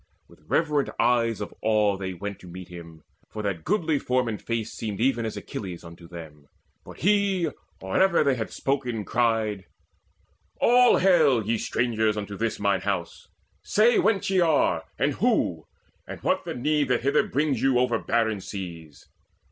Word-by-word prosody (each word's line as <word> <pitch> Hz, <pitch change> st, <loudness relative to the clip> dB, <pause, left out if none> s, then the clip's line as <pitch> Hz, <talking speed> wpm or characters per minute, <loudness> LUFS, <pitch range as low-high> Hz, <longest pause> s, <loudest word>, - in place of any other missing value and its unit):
With -, -, -20 dB
reverent 150 Hz, -, +1 dB
eyes 115 Hz, -3 st, +2 dB
of 105 Hz, -, -6 dB
awe 105 Hz, -2 st, +2 dB
they 95 Hz, -1 st, -5 dB
went 100 Hz, +3 st, -6 dB
To 90 Hz, -, -13 dB
meet 90 Hz, +1 st, -9 dB
him, 85 Hz, -3 st, -11 dB, 0.3 s
for 110 Hz, -, -6 dB
that 95 Hz, -6 st, -3 dB
goodly 160 Hz, -, +1 dB
form 125 Hz, -1 st, 0 dB
and 110 Hz, -2 st, -4 dB
face 115 Hz, -1 st, -3 dB
Seemed 105 Hz, -3 st, -5 dB
even 120 Hz, -2 st, +1 dB
as 110 Hz, -, -5 dB
very -, -, -7 dB
Achilles 90 Hz, -4 st, -7 dB
unto 85 Hz, 0 st, -12 dB
them. 80 Hz, -4 st, -11 dB, 0.4 s
But -, -, -13 dB
he, 195 Hz, -4 st, +2 dB, 0.3 s
or 95 Hz, -, -2 dB
ever 190 Hz, -4 st, +4 dB
they 140 Hz, -2 st, +3 dB
had 115 Hz, -3 st, -3 dB
spoken, 125 Hz, -6 st, -2 dB
cried: 110 Hz, -5 st, 0 dB, 0.9 s
"All 245 Hz, +1 st, +5 dB
hail, 155 Hz, -, +4 dB
ye 115 Hz, +1 st, 0 dB
strangers, 110 Hz, -3 st, 0 dB
unto 100 Hz, -1 st, -5 dB
this 115 Hz, +2 st, -2 dB
mine 100 Hz, -2 st, +1 dB
home 95 Hz, -4 st, -1 dB, 0.6 s
Say 225 Hz, +3 st, +3 dB
whence 195 Hz, -3 st, +1 dB
ye 190 Hz, -, +3 dB
are, 145 Hz, -, +2 dB
and -, -, +1 dB
who, -, -, 0 dB, 0.4 s
and -, -, -7 dB
what -, -, 0 dB
the -, -, -4 dB
need 150 Hz, +3 st, +1 dB
That 125 Hz, -1 st, +1 dB
hither 140 Hz, +1 st, +2 dB
brings 140 Hz, -3 st, 0 dB
you 135 Hz, -2 st, +3 dB
over 125 Hz, -2 st, +1 dB
barren 110 Hz, -3 st, 0 dB
seas." 85 Hz, -7 st, -8 dB
115 Hz, 170 wpm, -25 LUFS, 95-140 Hz, 0.9 s, All